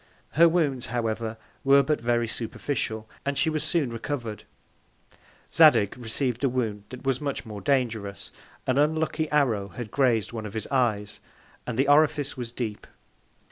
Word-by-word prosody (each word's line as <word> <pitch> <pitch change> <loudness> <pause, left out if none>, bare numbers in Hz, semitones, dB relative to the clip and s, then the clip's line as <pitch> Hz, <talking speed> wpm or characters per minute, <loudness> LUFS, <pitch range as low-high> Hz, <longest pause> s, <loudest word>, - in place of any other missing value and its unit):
Her 170 +2 +6
Wounds, 145 -7 0
however, 115 -1 -2 0.3
were 140 0 +6
but 150 -1 0
very 120 0 +1
superficial, 110 -1 -3 0.2
and 140 0 -2
she 160 - +2
was 155 -1 -1
soon 155 -8 +1
recover'd. 115 -2 -5 1.1
Zadig 100 - +6
receiv'd 125 +1 -3
a 135 - +4
Wound 110 -5 -2
that 130 +1 -10
was 135 0 0
much 140 -3 -3
more 105 -2 -7
dangerous: 110 -5 -1 0.3
An 130 +1 +2
unlucky 155 +1 +1
Arrow 120 -10 +2
had 110 +3 -8
graz'd 120 -6 +2
one 110 -2 -4
of 105 - -10
his 110 - -3
Eyes, 110 -6 0 0.5
and 120 -2 -3
the 135 +2 +2
Orifice 145 -1 +3
was 120 -2 -5
deep. 115 -4 -5
125 Hz, 155 wpm, -26 LUFS, 110-140 Hz, 1.1 s, Her